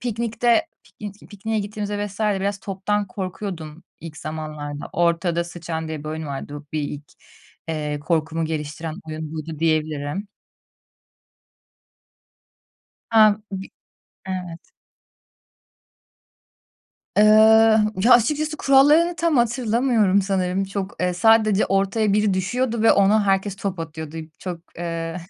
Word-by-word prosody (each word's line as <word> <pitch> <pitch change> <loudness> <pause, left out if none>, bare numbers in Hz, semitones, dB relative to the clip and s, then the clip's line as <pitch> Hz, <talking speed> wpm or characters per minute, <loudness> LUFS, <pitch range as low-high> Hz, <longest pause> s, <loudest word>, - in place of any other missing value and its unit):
piknikte 235 +4 +1 0.2
piknik 205 -1 -11
pikniğe 220 +2 -3
gittiğimizde 205 0 -3
vs. 200 +1 -11
biraz 200 -1 0
toptan 200 +1 -2
korkuyordum 185 -4 -6 0.2
ilk 165 -2 -9
zamanlarda. 150 -2 -6
Ortada 170 0 +1
sıçan 165 -2 -5
diye 155 -1 -4
bir - - -5
oyun 155 0 -5
vardı. 145 +1 -6
Bir 155 - -1
ilk, 145 0 -5 0.6
eee, 150 -2 -2
korkumu 160 +1 -1
geliştiren 155 0 -4
oyun 155 0 -6
buydu 155 0 -6
diyebilirim. 155 +3 -1 2.8
Hem 215 -1 +5
bi 190 0 -5 0.6
Evet. 180 - -6 2.5
Eee, 210 - +6 0.8
ya 245 - +7
açıkçası 300 +6 +3
kurallarını 295 +6 +4
tam 335 -3 +1
hatırlamıyorum 235 -4 +2
sanırım. 190 0 0
Çok, 195 0 -5
eee, 180 0 0
sadece 215 +1 +4
ortaya 195 +2 +1
biri 210 -1 +2
düşüyordu 235 +4 -1
ve 225 - +6
ona 200 +1 +3
herkes 195 0 +1
top 195 -2 -4
atıyordu. 160 -1 -7 0.2
Çok, 180 -3 -6 0.2
eee, 165 -1 -4
190 Hz, 110 wpm, -22 LUFS, 160-215 Hz, 2.8 s, ya